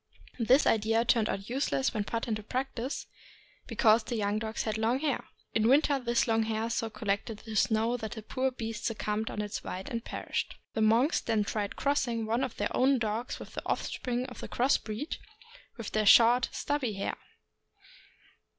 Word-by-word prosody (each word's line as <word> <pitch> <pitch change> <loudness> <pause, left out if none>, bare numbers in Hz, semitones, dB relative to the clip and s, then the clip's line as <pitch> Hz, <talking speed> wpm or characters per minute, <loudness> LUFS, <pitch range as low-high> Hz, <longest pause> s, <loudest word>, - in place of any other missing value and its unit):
This 250 +5 +5
idea 225 +1 +3
turned 230 -3 +3
out 195 +1 -3
useless 265 +1 0
when 210 -2 -1
put 230 +2 -3
in 225 - 0
practice, 250 +4 -3 0.6
because 220 -1 +4
the 235 - -4
young 210 -1 0
dogs 220 0 -3
had 215 -2 -2
long 230 +3 +2
hair. 285 -1 -1 0.3
In 220 0 +3
winter 280 +2 +4
this 240 -1 +1
long 225 -1 +3
hair 220 +1 -1
so 225 -1 -1
collected 210 +1 -2
the 220 -1 -6
snow 225 +3 +2
that 220 -2 -5
the 220 - -8
poor 260 +4 0
beasts 225 -4 -4
succumbed 220 -1 -2
under 210 - -3
its 205 - -5
weight 185 +1 -5
and 230 -1 -3
perished. - - -3 0.2
The 220 - -1
monks 230 +8 +4
then 220 -2 +1
tried 205 0 -3
crossing 245 -5 0
one 230 +4 0
of 245 - -3
their 205 - -1
own 265 +2 +4
dogs 225 +1 -2
with - - -10
the - - -4
offspring 250 0 -2
of 250 -1 -9
the - - -6
cross 260 +4 +2
breed, 225 +8 -5 0.6
with 230 -3 -6
their 215 -1 +1
short, 240 +4 +7
stubby 280 -6 -1
hair. 195 - -3
225 Hz, 185 wpm, -30 LUFS, 215-250 Hz, 0.6 s, short